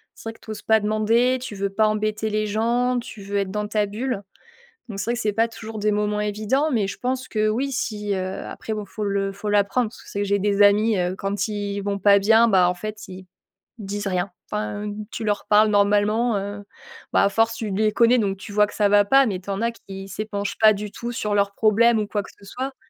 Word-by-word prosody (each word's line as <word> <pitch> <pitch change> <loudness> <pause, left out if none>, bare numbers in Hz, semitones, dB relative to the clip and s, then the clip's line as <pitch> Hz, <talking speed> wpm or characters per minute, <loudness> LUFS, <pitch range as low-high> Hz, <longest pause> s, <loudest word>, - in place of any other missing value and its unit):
c'est 225 - -7
vrai - - -7
que - - -22
tu 220 - -8
oses 210 - -7
pas 220 -1 +3
demander. 225 +4 +2
Tu 235 -5 -6
veux 200 0 -2
pas 215 +2 +2
embêter 215 0 -1
les 215 0 0
gens, 240 +4 +1
tu 225 -3 -9
veux 200 +1 -3
être 195 -1 -1
dans 210 0 -2
ta 210 -1 +1
bulle. 220 +1 -3 0.7
Donc 195 - -6
c'est 195 - -2
vrai 235 - 0
que - - -5
c'est 215 -3 0
pas 225 +2 +2
toujours 220 -1 -8
des 210 0 +1
moments 210 0 0
évidents. 215 +8 0
Mais 220 -6 +1
je 195 - -6
pense 255 +1 -2
que 215 -1 0
oui, 260 +6 -1
si, 210 -5 -2
heu 185 0 -3
après, 220 - -6
bon, 210 - -5
faut 210 +2 -6
le 200 -1 -1
faut 210 +2 -5
l'apprendre, 210 +3 +2
parce - - -15
que - - -19
c'est 200 - -5
vrai 205 - +1
que 200 - -4
j'ai 200 - +3
des 205 0 +1
amis, 210 +1 +4
heu, 180 +1 -1
quand 195 +1 -2
ils 205 -1 -3
vont 200 0 -2
pas 200 +1 +5 0.3
bah, 185 -5 +4
en 180 - -2
fait, 215 +2 -7
ils 185 0 -10 0.5
ils - - -7
disent 205 +1 -4
rien, 185 0 -1 0.2
enfin, 210 0 -3 0.2
tu - - -5
leur 205 -1 -1
parles 215 +1 +5
normalement, 210 +3 +2
heu, 205 +1 -5 0.5
bah, - - +4
à - - +3
force, 225 +3 +1
tu 220 -2 -4
les 215 +2 +1
connais, 235 +2 +4
donc 195 -3 -1
tu 200 +1 -10
vois 210 0 +4
que - - -11
ça 210 - +3
va 205 0 +5
pas. 270 +5 +5
Mais 195 -6 -2
tu 195 - -11
en 195 +1 -2
as 235 - +1
qui 195 -4 -10
s'épanchent 205 -1 -4
pas 215 -1 +7
du 205 0 -6
tout 235 0 -5
sur 210 -3 -2
leurs 200 0 +1
problèmes 225 +2 +4
ou 210 - -1
quoi 205 0 -1
que - - -12
ce 200 - -17
soit. 260 +6 -5
210 Hz, 255 wpm, -23 LUFS, 200-220 Hz, 0.7 s, pas